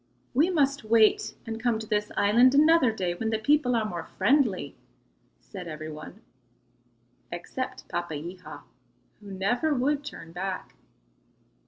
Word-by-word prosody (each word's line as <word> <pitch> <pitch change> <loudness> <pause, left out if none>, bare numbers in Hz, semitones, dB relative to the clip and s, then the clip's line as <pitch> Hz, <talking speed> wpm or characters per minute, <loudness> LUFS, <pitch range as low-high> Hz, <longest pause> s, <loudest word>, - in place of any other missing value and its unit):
"We 305 +8 +3
must 280 -5 +1
wait 220 0 +3
and 225 -1 -5
come 240 -2 +1
to 220 - -6
this 210 -1 -1
island 240 +6 +5
another 310 -3 +5
day 185 -5 -2
when 220 +5 -3
the 220 - 0
people 250 +2 +2
are 225 -2 +1
more 175 -5 -5
friendly," 230 -1 +2 0.6
said 185 -4 -9
every 155 0 -6
one 155 +7 -10 1.1
except 175 +9 -5
Papeiha, 175 -1 -6 0.6
who 205 -1 -12
never 245 +11 0
would 280 +3 0
turn 165 - -9
back. 185 +2 -5
220 Hz, 135 wpm, -27 LUFS, 180-260 Hz, 1.1 s, island